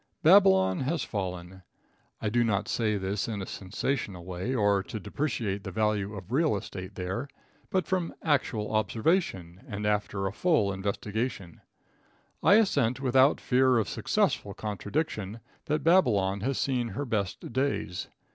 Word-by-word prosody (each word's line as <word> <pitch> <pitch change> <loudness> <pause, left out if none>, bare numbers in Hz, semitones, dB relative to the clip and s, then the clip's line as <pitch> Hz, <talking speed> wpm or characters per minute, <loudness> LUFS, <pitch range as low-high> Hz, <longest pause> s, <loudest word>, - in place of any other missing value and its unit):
Babylon 95 - +6
has 140 +3 -1
fallen. 95 -2 -5 0.6
I 110 - -1
do 120 +2 +2
not 105 -3 0
say 110 -3 0
this 95 +1 -2
in 110 -3 -3
a 95 - -4
sensational 100 -2 -3
way 95 +8 -3
or 100 -3 +3
to 110 +2 -6
depreciate 105 -2 -2
the 95 - -5
value 105 0 0
of 95 +1 -9
real 150 -1 +2
estate 95 -1 -8
there, 95 +9 -3 0.4
but 185 -3 +1
from 180 -2 -1
actual 120 -8 0
observation, 110 - 0
and 105 -3 -4
after 105 -1 0
a 95 - -2
full 115 - +2
investigation, 100 0 -3 0.8
I 200 - +6
assent 140 - +3
without 135 +1 +4
fear 130 0 +3
of 110 - +1
successful 100 - 0
contradiction, 105 - -3 0.3
that 150 +1 -1
Babylon 105 - +3
has 130 +7 -1
seen 125 -3 0
her 115 +7 -4
best 105 -2 -3
days. 130 -9 -1
105 Hz, 145 wpm, -28 LUFS, 95-130 Hz, 0.8 s, Babylon